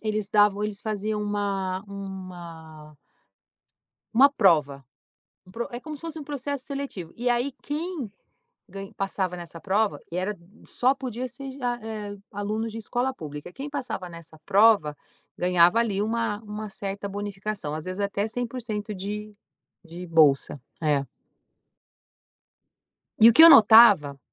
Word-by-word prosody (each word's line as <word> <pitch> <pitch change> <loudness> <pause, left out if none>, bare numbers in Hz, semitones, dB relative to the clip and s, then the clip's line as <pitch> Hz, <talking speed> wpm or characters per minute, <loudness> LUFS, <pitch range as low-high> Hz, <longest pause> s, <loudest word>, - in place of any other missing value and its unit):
eles 215 -2 -2
davam 205 0 +3
eles 210 -1 -4
faziam 215 0 -3
uma 200 -2 -2
uma 175 -6 -9 1.2
uma 270 +5 +7
prova, 150 - +2 0.6
um - - -16
pro 235 +5 -4
é 240 - -5
como 310 +2 -7
se - - -14
fosse 330 -1 -6
um 295 - -8
processo 285 -2 -5
seletivo, 275 - -6
e 245 +1 -1
aí, 245 +3 0
quem 300 - -4 0.6
gan 195 +1 -8
passava 190 -2 -2
nessa 170 -1 -9
prova 205 +2 0
e - - -3
era 195 +3 -2 0.3
só 255 +2 +1
podia 255 -2 -5
ser 270 +3 -8
de 265 0 -12
a 240 -1 -1
eh, 210 -2 -6 0.2
alunos 215 +2 -3
de 225 - -6
escola 245 +4 -2
pública, 150 - -8
quem 275 +3 -7
passava 245 -10 -4
nessa 165 -1 -12
prova 200 -8 +4 0.4
ganhava, 180 +3 +4
ali, 205 -3 0
uma 225 -1 -1
uma 210 0 -6
certa 200 +1 -5
bonificação, 200 -5 -5
às 155 - -6
vezes 185 +2 -5
até 200 +1 -1
100% 225 -3 -4
de 210 +2 -6 0.5
de 175 +2 -9
bolsa. 145 -4 +3 0.2
É. 145 -3 +1 2.1
E 225 +2 +8
o - - +4
que 320 - +9
eu 330 - +12
notava, 210 - +7
205 Hz, 145 wpm, -25 LUFS, 185-235 Hz, 2.1 s, eu